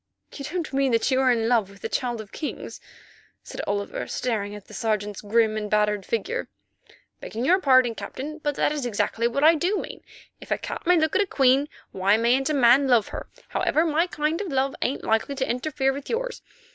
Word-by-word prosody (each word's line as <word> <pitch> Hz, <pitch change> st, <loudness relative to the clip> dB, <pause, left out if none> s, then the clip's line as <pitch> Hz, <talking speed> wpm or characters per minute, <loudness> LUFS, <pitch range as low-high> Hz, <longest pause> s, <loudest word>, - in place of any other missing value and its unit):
"You 280 Hz, -, -7 dB
don't 330 Hz, -1 st, -4 dB
mean 270 Hz, -2 st, +2 dB
that 230 Hz, +4 st, +2 dB
you 260 Hz, 0 st, +3 dB
are 260 Hz, -1 st, +4 dB
in 225 Hz, -2 st, +1 dB
love 230 Hz, -5 st, +2 dB
with 200 Hz, 0 st, -16 dB
the -, -, -1 dB
Child 240 Hz, -3 st, -2 dB
of 210 Hz, -, -13 dB
Kings?" 305 Hz, -, -6 dB, 0.6 s
said -, -, -6 dB
Oliver, 200 Hz, 0 st, -3 dB
staring 210 Hz, -4 st, -2 dB
at 210 Hz, -, -11 dB
the -, -, -15 dB
Sergeant's 210 Hz, -1 st, -2 dB
grim 215 Hz, +1 st, +2 dB
and 210 Hz, -1 st, -3 dB
battered 210 Hz, -2 st, +1 dB
figure. 450 Hz, -, -2 dB, 0.7 s
"Begging 230 Hz, +3 st, -5 dB
your 365 Hz, +7 st, +4 dB
pardon, 255 Hz, -5 st, +4 dB
Captain, 300 Hz, +7 st, -7 dB
that 295 Hz, -1 st, +1 dB
is 300 Hz, -2 st, -3 dB
exactly 230 Hz, +1 st, 0 dB
what 280 Hz, +5 st, -1 dB
I 320 Hz, +2 st, +8 dB
do 355 Hz, +6 st, 0 dB
mean. -, -, -6 dB, 0.4 s
If -, -, -13 dB
a -, -, +1 dB
cat -, -, -7 dB
may 360 Hz, 0 st, +5 dB
look 315 Hz, -1 st, +1 dB
at -, -, +4 dB
a 400 Hz, -, 0 dB
queen, 270 Hz, -1 st, +3 dB, 0.2 s
why 195 Hz, +3 st, +2 dB
mayn't 245 Hz, +5 st, +2 dB
a 305 Hz, -, +1 dB
man 265 Hz, +1 st, +5 dB
love 240 Hz, -5 st, +3 dB
her? -, -, -7 dB, 0.2 s
Howsoever, 320 Hz, +2 st, +1 dB
my 325 Hz, +2 st, +2 dB
kind 310 Hz, +1 st, -1 dB
of 410 Hz, -, -4 dB
love 270 Hz, -3 st, 0 dB
ain't 265 Hz, -, -1 dB
likely 225 Hz, +5 st, 0 dB
to 265 Hz, -1 st, -1 dB
interfere 270 Hz, +1 st, 0 dB
with 280 Hz, 0 st, -8 dB
yours. -, -, -3 dB
260 Hz, 210 wpm, -25 LUFS, 225-300 Hz, 0.7 s, I